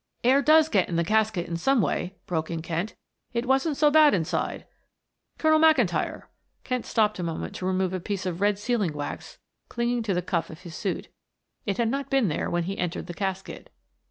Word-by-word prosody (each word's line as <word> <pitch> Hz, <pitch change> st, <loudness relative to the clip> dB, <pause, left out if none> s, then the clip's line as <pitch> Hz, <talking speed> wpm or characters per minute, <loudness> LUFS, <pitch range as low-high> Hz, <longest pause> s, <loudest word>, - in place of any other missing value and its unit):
"Air 265 Hz, +3 st, +5 dB
does 310 Hz, +2 st, +6 dB
get 200 Hz, -, +1 dB
in 170 Hz, -, -2 dB
the 170 Hz, -, +2 dB
casket 215 Hz, -1 st, +1 dB
in 170 Hz, -, -3 dB
some 270 Hz, +9 st, +2 dB
way," 185 Hz, -2 st, -1 dB
broke 160 Hz, -3 st, -2 dB
in 165 Hz, -2 st, -4 dB
Kent. 170 Hz, +5 st, -3 dB, 0.4 s
"It 235 Hz, +1 st, -1 dB
wasn't 270 Hz, +3 st, +1 dB
so 300 Hz, -1 st, +4 dB
bad 305 Hz, -3 st, +6 dB
inside. 165 Hz, -4 st, -2 dB, 0.7 s
Colonel 315 Hz, 0 st, +4 dB
McIntyre," 250 Hz, -, +3 dB, 0.4 s
Kent 250 Hz, -2 st, -3 dB
stopped 215 Hz, -3 st, +1 dB
a -, -, -2 dB
moment 165 Hz, -1 st, -4 dB
to 185 Hz, -, -3 dB
remove 190 Hz, 0 st, 0 dB
a 185 Hz, -, -1 dB
piece 190 Hz, +1 st, -4 dB
of 180 Hz, 0 st, -3 dB
red 205 Hz, 0 st, +3 dB
sealing 205 Hz, -6 st, 0 dB
wax 145 Hz, -1 st, -6 dB, 0.3 s
clinging 240 Hz, 0 st, -1 dB
to 205 Hz, -4 st, -1 dB
the 180 Hz, -, -1 dB
cuff 170 Hz, -2 st, -1 dB
of 160 Hz, +1 st, -11 dB
his 170 Hz, -3 st, -10 dB
suit. 190 Hz, +3 st, -3 dB, 0.6 s
It 200 Hz, -1 st, 0 dB
had 235 Hz, -2 st, +1 dB
not 275 Hz, +3 st, -2 dB
been 270 Hz, -8 st, +2 dB
there 150 Hz, -, -2 dB
when 175 Hz, 0 st, 0 dB
he 195 Hz, +3 st, -4 dB
entered 175 Hz, -2 st, -2 dB
the 175 Hz, -, -7 dB
casket. 190 Hz, 0 st, -4 dB
200 Hz, 205 wpm, -26 LUFS, 175-245 Hz, 0.7 s, does